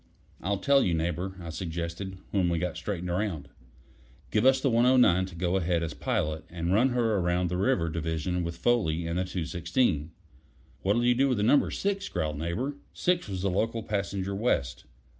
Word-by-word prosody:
"I'll 100 Hz, +3 st, 0 dB
tell 140 Hz, +8 st, +4 dB
you, 85 Hz, -, +1 dB
Neighbor," 85 Hz, +3 st, -2 dB
I 85 Hz, -2 st, -6 dB
suggested, 85 Hz, +2 st, -5 dB
when 95 Hz, -4 st, +2 dB
we 85 Hz, -, +1 dB
got 90 Hz, +1 st, -2 dB
straightened 90 Hz, -3 st, -4 dB
around. 85 Hz, -7 st, -2 dB, 0.8 s
"Give 110 Hz, +4 st, +3 dB
us 130 Hz, 0 st, +5 dB
the 135 Hz, -1 st, +1 dB
109 115 Hz, -6 st, +4 dB
to 90 Hz, -, -11 dB
go 90 Hz, +2 st, 0 dB
ahead 85 Hz, -2 st, 0 dB
as 80 Hz, -2 st, -3 dB
pilot, 85 Hz, -, -2 dB
and 85 Hz, +1 st, -2 dB
run 120 Hz, +6 st, +4 dB
her 115 Hz, -4 st, +1 dB
around 90 Hz, 0 st, +1 dB
the 90 Hz, -, -2 dB
river 95 Hz, -3 st, +1 dB
division 80 Hz, +2 st, -2 dB
with 85 Hz, 0 st, -4 dB
Foley 85 Hz, -6 st, +1 dB
and 85 Hz, +2 st, -1 dB
the 95 Hz, -, 0 dB
216." 85 Hz, -, 0 dB, 0.7 s
"What'll 105 Hz, +5 st, +2 dB
you 125 Hz, -, +5 dB
do 135 Hz, +3 st, +2 dB
with 125 Hz, -5 st, +1 dB
Number 120 Hz, +7 st, +4 dB
Six?" 200 Hz, 0 st, -2 dB
growled 75 Hz, -4 st, -2 dB
Neighbor. 115 Hz, -, -2 dB, 0.2 s
Six 180 Hz, -4 st, +1 dB
was 95 Hz, -1 st, -4 dB
the 100 Hz, -, +1 dB
local 115 Hz, +4 st, -1 dB
passenger 100 Hz, -2 st, -2 dB
west. 70 Hz, -, -1 dB
95 Hz, 180 wpm, -28 LUFS, 85-115 Hz, 0.8 s, us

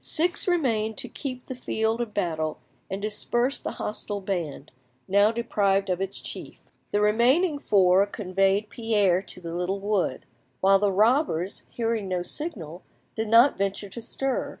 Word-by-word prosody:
Six 340 Hz, +4 st, +1 dB
remained 230 Hz, -11 st, +1 dB
to 270 Hz, -2 st, -2 dB
keep 255 Hz, -1 st, -6 dB
the -, -, -5 dB
field 225 Hz, -2 st, -1 dB
of 235 Hz, -3 st, -3 dB
battle 160 Hz, -6 st, -2 dB, 0.3 s
and 190 Hz, -, -3 dB
disperse 240 Hz, +5 st, 0 dB
the -, -, -4 dB
hostile 205 Hz, -1 st, -4 dB
band, 180 Hz, -7 st, -4 dB, 0.4 s
now 200 Hz, +2 st, +4 dB
deprived 200 Hz, -4 st, +1 dB
of 180 Hz, +1 st, -1 dB
its 195 Hz, 0 st, -2 dB
chief; -, -, -7 dB, 0.3 s
the 205 Hz, -, +2 dB
remaining 255 Hz, -, +3 dB
four 195 Hz, -4 st, +4 dB
conveyed 195 Hz, +1 st, 0 dB
Pierre 205 Hz, -6 st, +2 dB
to 190 Hz, -, -7 dB
the 170 Hz, -2 st, -7 dB
little 180 Hz, +3 st, -2 dB
wood, 200 Hz, -9 st, -1 dB, 0.3 s
while 195 Hz, +1 st, +5 dB
the 205 Hz, 0 st, +2 dB
robbers, 210 Hz, -, +1 dB
hearing 225 Hz, -3 st, -2 dB
no 180 Hz, -1 st, -1 dB
signal, 180 Hz, -, -4 dB, 0.3 s
did 220 Hz, 0 st, -3 dB
not 230 Hz, +4 st, +5 dB
venture 200 Hz, +1 st, -2 dB
to 235 Hz, -, -8 dB
stir. 270 Hz, +3 st, -2 dB
205 Hz, 155 wpm, -26 LUFS, 190-235 Hz, 0.4 s, while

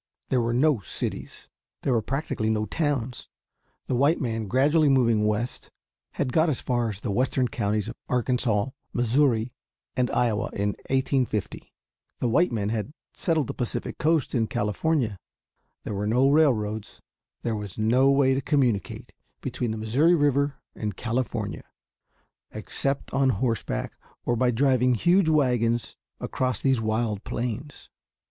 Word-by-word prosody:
There 125 Hz, -, +2 dB
were 115 Hz, 0 st, 0 dB
no 135 Hz, +1 st, +3 dB
cities. 90 Hz, -, -6 dB, 0.4 s
There 135 Hz, -, +2 dB
were 115 Hz, -, +2 dB
practically 130 Hz, -3 st, -2 dB
no 110 Hz, -1 st, +1 dB
towns. 130 Hz, -1 st, -2 dB, 0.6 s
The -, -, -2 dB
white 140 Hz, +7 st, +3 dB
man 115 Hz, -4 st, -2 dB
gradually 145 Hz, -, +3 dB
moving 115 Hz, -5 st, +3 dB
west 105 Hz, +3 st, -2 dB, 0.4 s
had 130 Hz, -3 st, -2 dB
got 160 Hz, +1 st, +4 dB
as 140 Hz, -, -1 dB
far 120 Hz, -2 st, 0 dB
as 105 Hz, -1 st, -7 dB
the 105 Hz, -, -2 dB
western 130 Hz, +3 st, +1 dB
counties 105 Hz, -3 st, -1 dB
of -, -, -5 dB, 0.2 s
Arkansas, 125 Hz, -3 st, +1 dB, 0.2 s
Missouri, 120 Hz, -1 st, +2 dB, 0.4 s
and 125 Hz, -1 st, +1 dB
Iowa 115 Hz, -4 st, +1 dB
in 100 Hz, +1 st, 0 dB, 0.2 s
1850; 130 Hz, -5 st, -1 dB, 0.5 s
the -, -, -1 dB
white 170 Hz, +9 st, +3 dB
men 105 Hz, -3 st, -1 dB
had 115 Hz, +5 st, -3 dB, 0.2 s
settled 160 Hz, -6 st, 0 dB
the -, -, -5 dB
Pacific 120 Hz, -, -4 dB
coast 160 Hz, -3 st, +1 dB
in 115 Hz, -3 st, +1 dB
California; 110 Hz, -, 0 dB, 0.6 s
there -, -, -4 dB
were 100 Hz, +1 st, -2 dB
no 130 Hz, +5 st, +3 dB
railroads; 110 Hz, -9 st, +1 dB, 0.4 s
there 115 Hz, -2 st, -1 dB
was 105 Hz, -3 st, -6 dB
no 120 Hz, +5 st, +4 dB
way 135 Hz, -1 st, +4 dB
to 135 Hz, -, 0 dB
communicate 130 Hz, -8 st, 0 dB, 0.3 s
between 120 Hz, -, -3 dB
the 110 Hz, -, -3 dB
Missouri 130 Hz, +11 st, +3 dB
River 145 Hz, -2 st, +2 dB, 0.2 s
and 105 Hz, -3 st, -4 dB
California, 120 Hz, 0 st, -2 dB, 0.9 s
except 135 Hz, 0 st, -3 dB
on 135 Hz, -1 st, +3 dB
horseback 115 Hz, -1 st, -1 dB, 0.3 s
or 120 Hz, -, +1 dB
by 125 Hz, +2 st, +2 dB
driving 125 Hz, 0 st, +3 dB
huge 175 Hz, -, +3 dB
wagons 120 Hz, -6 st, +1 dB, 0.2 s
across 130 Hz, -1 st, -1 dB
these 130 Hz, -4 st, +2 dB
wild 110 Hz, -1 st, -1 dB
plains. 125 Hz, +4 st, -5 dB
125 Hz, 145 wpm, -26 LUFS, 110-135 Hz, 0.9 s, got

